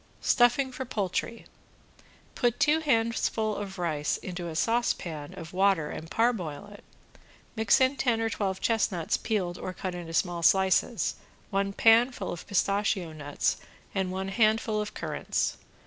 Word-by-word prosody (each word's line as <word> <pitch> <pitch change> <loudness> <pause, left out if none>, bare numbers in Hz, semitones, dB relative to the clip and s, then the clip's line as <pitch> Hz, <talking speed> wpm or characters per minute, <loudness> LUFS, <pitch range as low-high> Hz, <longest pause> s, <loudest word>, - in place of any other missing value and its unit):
~STUFFING 260 +2 +3
FOR 260 - -5
POULTRY~ 225 0 -3 0.9
Put 240 -2 0
two 300 +2 +4
handfuls 225 -6 0
of 195 -1 -6
rice 155 -4 -1
into 175 -2 -6
a 165 - -6
saucepan 170 -9 -1
of 165 0 -9
water 190 -5 +2
and 160 - -7
parboil 205 -8 -1
it, 205 - -14 0.7
mix 220 -2 +4
in 260 +1 +3
ten 235 -4 +1
or 225 - +1
twelve 195 -3 -2
chestnuts 200 -7 +1
peeled 185 -5 -2
or 185 - -5
cut 185 0 -4
into 170 -2 -7
small 175 -1 0
slices, 190 +3 +3 0.3
one 195 0 0
pan 230 +5 +5
full 200 -6 -5
of 175 - -7
pistachio 200 -3 0
nuts 145 -2 -1 0.4
and 190 -2 -1
one 190 +1 -3
handful 215 0 +2
of 210 - -6
currants. - - -2
200 Hz, 145 wpm, -28 LUFS, 175-225 Hz, 0.9 s, pan